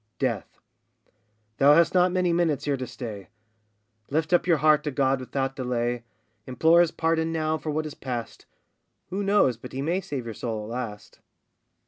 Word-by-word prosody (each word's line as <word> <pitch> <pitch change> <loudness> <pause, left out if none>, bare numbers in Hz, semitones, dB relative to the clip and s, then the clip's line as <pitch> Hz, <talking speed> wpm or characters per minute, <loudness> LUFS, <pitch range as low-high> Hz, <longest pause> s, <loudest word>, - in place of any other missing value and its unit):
DEATH. - - -3 1.0
Thou 145 +2 +6
hast 170 +1 +4
not 180 0 +4
many 180 -1 +1
minutes 170 -4 +1
here 145 -1 +1
to 130 -1 -5
stay, 105 -7 -8 0.8
Lift 155 +4 0
up 175 - +3
your 170 -3 +4
heart 150 0 +4
to 150 - -1
God 135 -1 +1
without 135 +1 -3
delay, 120 -2 -2 0.4
Implore 160 +7 +4
his 175 - +3
pardon 165 0 0
now 155 -1 0
for 155 - -5
what 155 +1 -1
is 155 - -6
past, 120 -3 -6 0.6
Who 195 +2 -2
knows 195 - +3
but - - -11
He 135 - -3
may 175 +5 0
save 135 -9 -5
your 115 - -5
soul 110 -1 -4
at 105 - -8
last? 105 -4 -7
145 Hz, 175 wpm, -26 LUFS, 125-165 Hz, 1.0 s, Thou